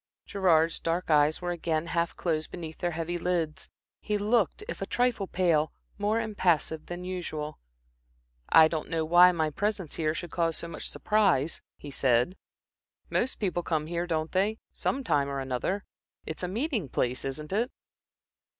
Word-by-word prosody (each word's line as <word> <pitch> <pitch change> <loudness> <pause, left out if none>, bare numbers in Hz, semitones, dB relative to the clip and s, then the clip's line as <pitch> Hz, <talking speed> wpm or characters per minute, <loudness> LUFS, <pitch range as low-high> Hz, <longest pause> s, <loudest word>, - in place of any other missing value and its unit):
Gerard's 165 -4 +3
dark 170 +1 -1
eyes 150 +3 +4
were 175 - -1
again 165 -2 -1
half 170 0 -1
closed 155 -3 -1
beneath 160 -3 -7
their 175 - 0
heavy 170 +1 -2
lids. 170 -3 -1 0.3
He 210 -1 -1
looked, 220 - +1
if - - -6
a - - -2
trifle 245 -5 +1
pale, 165 -5 +2 0.3
more 210 +2 +1
impassive 175 -8 0
than 175 +1 -6
usual. 165 -5 -4 0.9
"I 160 -1 +8
don't 160 -1 -3
know 165 -1 0
why 175 +3 +7
my 160 -3 0
presence 205 -2 -2
here 155 -1 0
should 175 -1 -5
cause 165 -2 0
so 170 - -6
much 170 - -5
surprise," 190 -9 +2 0.2
he 145 - -9
said. 130 +5 +2 0.8
"Most 260 - 0
people 180 -4 -1
come 160 -3 -1
here, 170 +2 -2
don't 160 -2 -1
they, 200 +4 +1 0.2
some 275 - -1
time 140 - +1
or 140 0 -2
another. 135 +10 -2 0.4
It's 160 - -4
a 180 - -1
a - - -6
meeting 225 - -1
place, 125 0 -1
isn't 150 +5 -4
it?" 235 +5 +1
170 Hz, 170 wpm, -28 LUFS, 155-190 Hz, 0.9 s, I